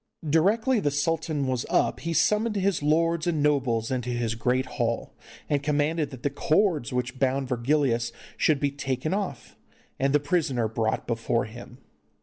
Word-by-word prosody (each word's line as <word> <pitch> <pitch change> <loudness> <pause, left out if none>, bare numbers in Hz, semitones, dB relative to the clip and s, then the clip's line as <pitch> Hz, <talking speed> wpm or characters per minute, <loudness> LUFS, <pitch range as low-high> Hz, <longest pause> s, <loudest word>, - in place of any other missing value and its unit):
Directly 215 - +3
the 150 - +1
sultan 155 0 -1
was 130 -2 -1
up - - +1
he 165 - -3
summoned 210 +6 +2
his 195 -4 +1
lords 165 +3 +2
and 160 -4 +1
nobles 130 -6 +1
into 125 -1 -2
his 120 -2 -1
great 125 +3 0
hall, 120 -2 -2 0.3
and 145 -2 +1
commanded 150 +1 0
that 130 -3 -11
the 145 - 0
cords 155 - +1
which 125 +1 -3
bound 135 0 +1
Virgilius 120 -1 +1 0.2
should 155 -3 +2
be 140 0 0
taken 135 +2 -2
off, 200 -1 -4 0.4
and 135 +1 +2
the 150 - +4
prisoner 145 -6 0
brought 110 0 -1
before 115 +1 0
him. 120 +2 -11
140 Hz, 160 wpm, -26 LUFS, 125-160 Hz, 0.4 s, the